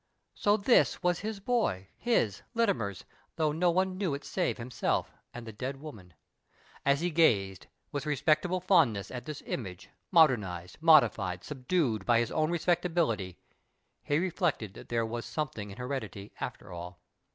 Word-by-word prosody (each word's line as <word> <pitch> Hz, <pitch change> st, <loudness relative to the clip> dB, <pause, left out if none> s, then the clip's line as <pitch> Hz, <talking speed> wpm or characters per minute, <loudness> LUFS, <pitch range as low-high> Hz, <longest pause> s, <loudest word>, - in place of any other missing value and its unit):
So 205 Hz, +1 st, +2 dB
this 220 Hz, +4 st, +3 dB
was 175 Hz, -1 st, +2 dB
his 215 Hz, 0 st, -4 dB
boy, 200 Hz, -, 0 dB
his, 115 Hz, -, 0 dB
Littimer's, 120 Hz, -, 0 dB, 0.3 s
thoTigh 155 Hz, -2 st, +1 dB
no 175 Hz, +2 st, +3 dB
one 185 Hz, +2 st, +1 dB
knew 180 Hz, -8 st, 0 dB
it 140 Hz, -, -8 dB
save 185 Hz, -, -1 dB
himself 120 Hz, +1 st, -2 dB, 0.2 s
and 120 Hz, -1 st, -8 dB
the 110 Hz, -, -7 dB
dead 130 Hz, +5 st, -5 dB
woman! 105 Hz, -, -11 dB, 0.7 s
And 140 Hz, -, +4 dB
as 140 Hz, -, -3 dB
he 175 Hz, +1 st, 0 dB
gazed, 100 Hz, -, +2 dB, 0.2 s
with 145 Hz, +1 st, -4 dB
respectable 155 Hz, +5 st, +1 dB
fond 170 Hz, -, +4 dB
ness, 100 Hz, -2 st, -6 dB
at 125 Hz, -1 st, -6 dB
this 155 Hz, -2 st, -7 dB
image, 95 Hz, -6 st, -6 dB, 0.2 s
modernized, 105 Hz, -, +2 dB
modified, 110 Hz, -, +4 dB
subdued, 130 Hz, -, -1 dB
of 120 Hz, -, +6 dB
his 120 Hz, 0 st, 0 dB
o\vn 155 Hz, 0 st, +1 dB
respectability, 170 Hz, -, 0 dB, 0.6 s
he 145 Hz, -, 0 dB
reflected 170 Hz, -, -1 dB
that -, -, -12 dB
there 115 Hz, -1 st, +1 dB
was 115 Hz, +1 st, -4 dB
something 130 Hz, -9 st, -4 dB
in 100 Hz, -, -10 dB
heredity, 125 Hz, -6 st, -5 dB
after -, -, -6 dB
all. 90 Hz, +1 st, -8 dB
140 Hz, 160 wpm, -30 LUFS, 105-175 Hz, 0.7 s, of